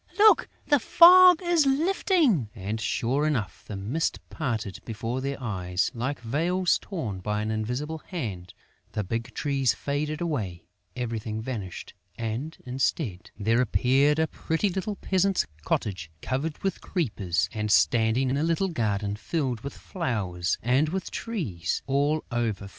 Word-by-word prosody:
Look! 430 +1 +6 0.2
The 290 - +4
fog 360 +5 +8
is 340 -4 +3
lifting!" 290 - +2
And, 105 +2 -4
sure 130 +6 0
enough, 125 -10 -2
the 105 - -5
mist 115 +12 -1
parted 110 - -3
before 115 +3 -3
their 140 +1 -3
eyes, 90 -7 -1
like 130 +4 -3
veils 170 +10 +1
torn 120 - -4
by 105 +2 -2
an 110 - -2
invisible 125 +9 -3
hand; 105 - -6 0.4
the 105 - -1
big 115 +4 -3
trees 135 -6 +1
faded 150 +4 -2
away, 110 - -3 0.3
everything 115 -3 -3
vanished 110 -6 -6 0.2
and, 120 +8 -4
instead, 125 - -2
there 115 +4 +2
appeared 135 +5 +3
a 160 - +3
pretty 160 +5 -1
little 195 +3 -3
peasant's 195 0 +1 0.2
cottage, 85 -4 -2
covered 145 +5 -2
with 195 - -1
creepers 100 - -1
and 105 -1 -2
standing 120 +4 +3
in 135 - +1
a 145 - 0
little 170 +4 +1
garden 105 - -1
filled 130 +1 -2
with 140 - -7
flowers 100 - -2
and 130 +6 +3
with 190 +1 -4
trees 125 - -3
all 145 +3 +1
over 110 -4 -1
fruit. - - -12
130 Hz, 145 wpm, -27 LUFS, 110-160 Hz, 0.4 s, fog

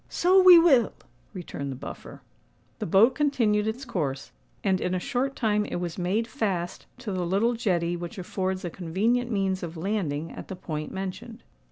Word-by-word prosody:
"So 370 +2 +4
we 365 -2 +10
will," 280 -9 +5 0.4
returned 160 -7 -6
the - - -5
Buffer. - - -9 0.6
The - - -3
boat 210 +9 +5
continued 225 -8 +1
its 240 +5 -3
course; 150 - -3 0.3
and 190 -1 +1
in 180 - 0
a - - 0
short 265 +8 -2
time 210 -3 +1
it - - -5
was 175 0 -4
made 200 +6 0
fast 190 -6 -3
to 245 -4 -6
the 185 -2 -1
little 200 +7 +1
jetty 175 -7 0
which 175 +1 -7
affords 185 0 -3
a 175 - -4
convenient 215 +9 0
means 195 -4 0
of 170 -1 -6
landing 165 -5 -2
at - - -9
the 190 - -6
point 155 -4 -5
mentioned. 195 +5 -6
195 Hz, 180 wpm, -26 LUFS, 175-230 Hz, 0.6 s, we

